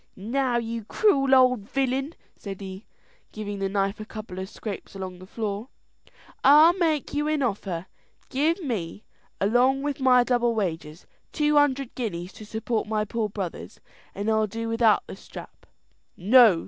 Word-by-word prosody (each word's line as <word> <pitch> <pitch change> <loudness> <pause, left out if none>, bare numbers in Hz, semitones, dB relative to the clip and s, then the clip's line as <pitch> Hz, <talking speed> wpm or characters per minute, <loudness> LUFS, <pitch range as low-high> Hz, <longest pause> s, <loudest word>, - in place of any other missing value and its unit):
"Now 245 +5 0
you 230 -1 -3
cruel 275 - +3
old 255 -5 +3
villain," 270 +3 -1 0.2
said 195 -2 -8
he, 190 +1 -8 0.4
giving 205 -2 -5
the 195 0 -1
knife 195 +2 -1
a - - -5
couple 215 -4 -8
of 190 0 -5
scrapes 210 -3 -7
along 185 -2 -6
the 185 - -12
floor, 210 +1 -4 0.8
"I'll 305 +5 +8
make 315 -5 0
you 295 +1 0
an 305 -2 +1
offer. 195 -6 -2 0.4
Give 315 +7 +1
me, 205 - -4 0.4
along 250 +6 +3
with 290 -1 -2
my 255 -2 +5
double 240 -1 +1
wages, 165 -5 -3 0.3
two 300 -1 +1
hundred 275 -3 +2
guineas 185 -7 -4
to 215 - -11
support 220 +1 -2
my 215 -1 0
poor 215 0 -2
brothers, 190 -4 -6 0.4
and 200 +1 -4
I'll 220 -1 +2
do 225 +3 -5
without 230 -2 +3
the - - -8
strap." - - -12 0.5
"No!" 215 -1 +6
225 Hz, 160 wpm, -25 LUFS, 200-265 Hz, 0.8 s, I'll